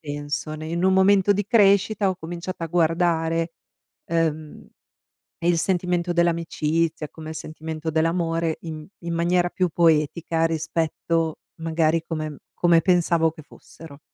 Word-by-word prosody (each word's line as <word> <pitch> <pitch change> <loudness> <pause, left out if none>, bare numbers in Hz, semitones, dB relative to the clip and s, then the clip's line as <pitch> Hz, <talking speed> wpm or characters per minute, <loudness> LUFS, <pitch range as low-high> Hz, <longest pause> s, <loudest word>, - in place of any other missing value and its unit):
senso 145 +1 -4
ne 155 +1 -7
in 170 +2 -2
un 190 - +4
momento 195 +1 +4
di 205 0 -1
crescita 200 -2 +3
ho 185 - -2
cominciato 175 +1 -6
a - - -2
guardare, 165 0 +1 0.5
ehm, 160 -2 -2 0.8
il 175 -1 +3
sentimento 180 0 0
dell'amicizia 165 -2 0
come 155 -1 -10
il - - -6
sentimento 160 0 -5
dell'amore 165 0 0
in 155 -2 -7 0.2
in 170 0 -2
maniera 175 +1 +1
più 185 0 0
poetica 165 0 +2
rispetto 165 0 -1 0.2
magari 160 0 +1
come 155 -3 -4 0.2
come 170 -1 +4
pensavo 170 -2 +2
che 155 - -12
fossero. 145 0 -14
165 Hz, 130 wpm, -23 LUFS, 160-175 Hz, 0.8 s, un